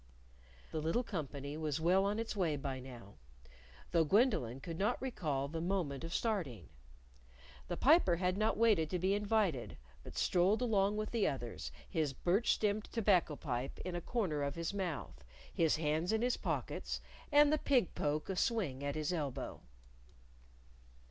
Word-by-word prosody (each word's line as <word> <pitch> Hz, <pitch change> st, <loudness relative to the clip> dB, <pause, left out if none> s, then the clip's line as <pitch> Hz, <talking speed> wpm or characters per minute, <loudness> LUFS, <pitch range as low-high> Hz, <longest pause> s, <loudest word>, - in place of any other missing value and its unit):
The 155 Hz, -, -2 dB
little 165 Hz, +11 st, +1 dB
company 145 Hz, -, -5 dB
was 155 Hz, -2 st, -1 dB
well 185 Hz, +4 st, +3 dB
on 205 Hz, +1 st, 0 dB
its 225 Hz, -1 st, -3 dB
way 175 Hz, -7 st, +1 dB
by 135 Hz, -2 st, -4 dB
now 120 Hz, -8 st, -11 dB, 0.7 s
though 170 Hz, -2 st, +4 dB
Gwendolyn 160 Hz, -, +2 dB
could 165 Hz, +3 st, -6 dB
not 200 Hz, -, +1 dB
recall 150 Hz, -, -2 dB
the 160 Hz, +3 st, -4 dB
moment 170 Hz, -6 st, -1 dB
of 165 Hz, -, -5 dB
starting. 165 Hz, -, -2 dB, 1.0 s
The -, -, -3 dB
Piper 285 Hz, -, +5 dB
had 180 Hz, +1 st, 0 dB
not 215 Hz, +1 st, +1 dB
waited 210 Hz, -9 st, +3 dB
to 180 Hz, -, -1 dB
be 190 Hz, +3 st, +1 dB
invited, 205 Hz, -, 0 dB, 0.3 s
but -, -, -10 dB
strolled 185 Hz, +5 st, +3 dB
along 205 Hz, -3 st, +2 dB
with 215 Hz, 0 st, -3 dB
the 230 Hz, -3 st, +2 dB
others, 115 Hz, -, -4 dB, 0.2 s
his 155 Hz, -4 st, -1 dB
birch 190 Hz, -, +2 dB
stemmed 210 Hz, 0 st, 0 dB
tobacco 195 Hz, -9 st, +2 dB
pipe 130 Hz, -2 st, -3 dB
in 180 Hz, -1 st, -3 dB
a 175 Hz, -, -2 dB
corner 180 Hz, -9 st, -1 dB
of 140 Hz, 0 st, -2 dB
his 170 Hz, +2 st, -3 dB
mouth, 175 Hz, -, -4 dB, 0.3 s
his 165 Hz, -2 st, +3 dB
hands 155 Hz, +3 st, 0 dB
in 220 Hz, +1 st, +1 dB
his 250 Hz, 0 st, +2 dB
pockets, -, -, -3 dB, 0.3 s
and 295 Hz, 0 st, +6 dB
the 310 Hz, -, +2 dB
pig 255 Hz, -10 st, +2 dB
poke 150 Hz, +1 st, -1 dB
a 190 Hz, -, -2 dB
swing 180 Hz, -, 0 dB
at 140 Hz, 0 st, -2 dB
his 155 Hz, +3 st, -1 dB
elbow. 145 Hz, -6 st, -4 dB
175 Hz, 165 wpm, -35 LUFS, 145-210 Hz, 1.0 s, and